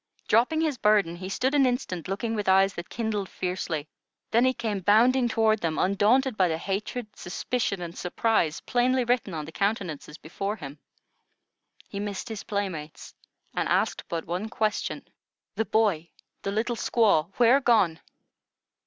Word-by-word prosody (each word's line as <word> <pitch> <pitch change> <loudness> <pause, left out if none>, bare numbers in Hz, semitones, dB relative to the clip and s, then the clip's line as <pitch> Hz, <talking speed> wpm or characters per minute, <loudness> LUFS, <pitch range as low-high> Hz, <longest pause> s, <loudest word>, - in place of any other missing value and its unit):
Dropping 250 +9 +3
his 300 -6 -1
burden, 205 -5 +3
he 185 +1 -6
stood 260 +7 0
an 275 -3 +4
instant 245 - -2
looking 215 +4 -2
with 210 -3 -1
eyes 195 +1 +5
that 175 - -7
kindled 215 -4 -2
fiercely; 175 -4 -3 0.4
then 235 +3 +4
he 260 - +4
came 220 -5 -3
bounding 240 +6 +4
toward 220 -1 +2
them, 165 -4 -2
undaunted 215 +7 +2
by 185 -3 +3
the 160 -2 -1
hatred, 210 +5 -4
suspicion, 200 +1 -2
and 170 0 -7
surprise 180 -4 0
plainly 250 +1 +1
written 240 -6 0
on 155 -1 -4
the 160 - -9
countenances 180 -7 -2
before 195 +6 -4
him. 145 -6 -9 1.1
He 200 - -6
missed 205 +2 -4
his 220 -3 -5
playmates, 185 -7 -5 0.4
and - - -1
asked - - +1
but 165 -1 -3
one 185 +6 -3
question: 215 -1 -2 0.5
"The 220 - -1
boy, 200 -8 +1 0.3
the 195 - -3
little 230 +4 -1
squaw, 205 -9 +2
where 245 +3 +6
gone?" 195 -10 +3
205 Hz, 155 wpm, -26 LUFS, 180-235 Hz, 1.1 s, where